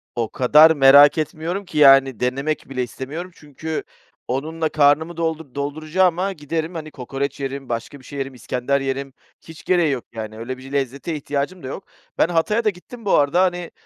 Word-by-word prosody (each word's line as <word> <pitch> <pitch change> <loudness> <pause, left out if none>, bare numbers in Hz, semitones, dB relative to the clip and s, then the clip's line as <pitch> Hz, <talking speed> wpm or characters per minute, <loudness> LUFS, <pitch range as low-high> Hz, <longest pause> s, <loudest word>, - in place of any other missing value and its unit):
o 115 -2 -1
kadar 150 +5 +6
merak 145 0 +7
etmiyorum 165 +5 -3
ki, 175 - -7
yani, 135 -4 +6
denemek 140 +5 -2
bile 130 -2 -2
istemiyorum; 145 +9 -7
çünkü 155 +2 -6 0.4
onunla 155 +5 -2
karnımı 150 +3 +2
doldur 160 -4 -3
dolduracağıma, 165 +6 0
giderim, 160 +1 -4
hani, 155 -1 -6
kokoreç 135 +2 -4
yerim, 135 -1 -5
başka 120 +4 -4
bir - - -19
şey 140 - -7
yerim, 135 0 -4
iskender 125 +2 -2
yerim; 135 0 -3 0.3
hiç 160 -1 -13
gereği 175 -5 +2
yok 130 -3 -3
yani, 110 -1 -7
öyle 125 +3 -5
bir 130 +1 -12
lezzete 140 +3 -2
ihtiyacım 145 +4 -3
da - - -6
yok. 140 - -7 0.3
Ben - - +4
Hatay'a 175 +7 +1
da 215 - +3
gittim 215 +5 -11
bu 200 - +2
arada, 145 +5 +3
hani, 175 -2 -1
145 Hz, 180 wpm, -21 LUFS, 135-165 Hz, 0.4 s, merak